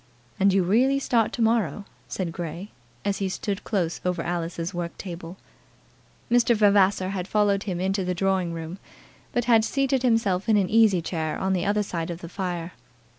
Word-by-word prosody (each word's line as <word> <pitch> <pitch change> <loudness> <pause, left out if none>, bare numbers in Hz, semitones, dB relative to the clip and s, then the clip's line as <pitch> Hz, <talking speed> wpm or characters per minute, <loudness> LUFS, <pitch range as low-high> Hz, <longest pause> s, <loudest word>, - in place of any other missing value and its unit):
"And 195 +1 +5
you 190 -1 +3
really 245 +9 +3
start 235 -5 +1
to 235 - 0
morrow?" 210 -5 +1 0.2
said 180 -3 -3
Grey, 175 +3 -6 0.3
as 200 -1 0
he 195 -1 -1
stood 200 +1 -3
close 175 -6 -1
over 180 -2 -1
Alice's 170 +1 -3
work 175 -1 -4
table. 175 -1 -7 0.9
Mr. 240 0 +4
Vavasor 200 -3 +3
had 190 -2 -3
followed 205 -2 +2
him 180 -4 -3
into 190 +1 0
the 180 0 -2
drawing 190 -1 0
room, 165 +3 -6 0.5
but 240 -1 0
had 230 -2 +5
seated 270 +2 +1
himself 225 -5 +1
in 215 - +5
an 190 -3 +1
easy 215 -6 +4
chair 160 -2 -2
on 190 0 0
the 180 -2 0
other 210 +1 +2
side 170 -4 -4
of 170 0 -6
the 170 - -8
fire. 175 -2 -4
190 Hz, 180 wpm, -25 LUFS, 175-210 Hz, 0.9 s, And